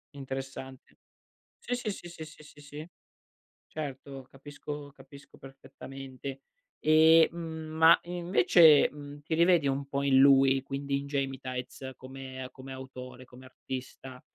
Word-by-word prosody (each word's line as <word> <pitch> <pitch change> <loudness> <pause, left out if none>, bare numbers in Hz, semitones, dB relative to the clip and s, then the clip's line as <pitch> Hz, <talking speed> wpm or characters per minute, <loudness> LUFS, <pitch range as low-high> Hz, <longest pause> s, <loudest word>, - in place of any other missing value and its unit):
Interessante. 135 -1 -8 0.6
Sì, 245 - -3
sì, 225 -4 -3
sì, 175 -2 -9
sì, 160 -2 -9
sì, 155 0 -15
sì, 145 -1 -16
sì. 150 +3 -10 0.8
Certo, 135 -2 -7
capisco 145 +1 -9
capisco 140 0 -16
perfettamente. 135 0 -10 0.4
E, 160 +1 +6
mhmm, 160 -2 -7
ma 160 +1 +7
invece, 175 -3 +5
mhmm, 145 0 -11
ti 160 +2 -3
rivedi 170 -3 +4
un 135 +1 -1
po' 140 0 -3
in 135 -1 +3
lui, 135 -1 +5
quindi 140 0 -3
in 140 - -8
Gemitaiz, 130 -1 -4
come 130 0 -9
come 135 0 -11
autore, 130 -1 -10
come 130 +1 -15
artista? 130 0 -9
140 Hz, 130 wpm, -29 LUFS, 130-155 Hz, 0.8 s, ma